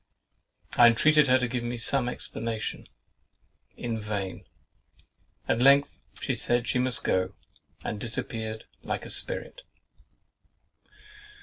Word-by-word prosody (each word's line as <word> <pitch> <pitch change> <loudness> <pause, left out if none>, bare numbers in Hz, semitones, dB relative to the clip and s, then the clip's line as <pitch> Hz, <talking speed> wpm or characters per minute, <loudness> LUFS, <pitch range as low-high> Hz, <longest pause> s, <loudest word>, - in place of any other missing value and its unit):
I 120 - +10
intreated 150 +6 +5
her 130 0 +5
to 125 -1 -1
give 120 0 -3
me 120 0 -3
some 125 +2 +1
explanation. 115 -2 -4 0.9
In 115 -2 -3
vain! 105 -3 -4 1.0
At 115 - +1
length 140 +2 +5 0.2
she - - -1
said 120 0 0
she 125 - +1
must 125 -3 +2
go, 95 0 0 0.5
and 105 - -4
disappeared 110 -1 -3 0.2
like - - -4
a - - -7
spirit. - - -2
120 Hz, 115 wpm, -27 LUFS, 110-130 Hz, 1.0 s, I